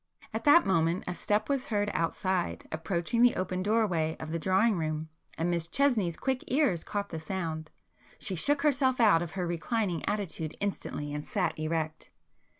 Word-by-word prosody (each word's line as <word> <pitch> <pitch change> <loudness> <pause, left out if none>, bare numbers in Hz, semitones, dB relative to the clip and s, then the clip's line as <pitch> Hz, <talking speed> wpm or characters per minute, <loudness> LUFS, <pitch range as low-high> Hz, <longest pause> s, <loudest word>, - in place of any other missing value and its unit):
At 220 +1 -3
that 295 +4 +7
moment 170 -1 +2
a 180 - -3
step 210 +4 0
was 275 -1 -1
heard 205 -2 0
outside, 180 +2 -1
approaching 170 +7 -1
the 245 0 +6
open 185 0 -2
doorway 185 -7 +1
of 155 0 -6
the 165 - -1
drawing 190 +6 +3
room, 155 0 -2 0.3
and 170 +2 0
Miss 170 -1 -1
Chesney's 215 - +1
quick 265 -1 -1
ears 250 - +2
caught 200 -1 -3
the 160 - -5
sound. 160 -2 -4 0.5
She 195 - -3
shook 280 - +2
herself 265 -3 +2
out 210 -8 +5
of 170 -2 -5
her 185 -2 -2
reclining 175 0 -1
attitude 175 -6 -2
instantly 150 -7 -3
and 150 0 -3
sat 180 -5 -1
erect. 155 0 -2
185 Hz, 170 wpm, -29 LUFS, 165-220 Hz, 0.5 s, that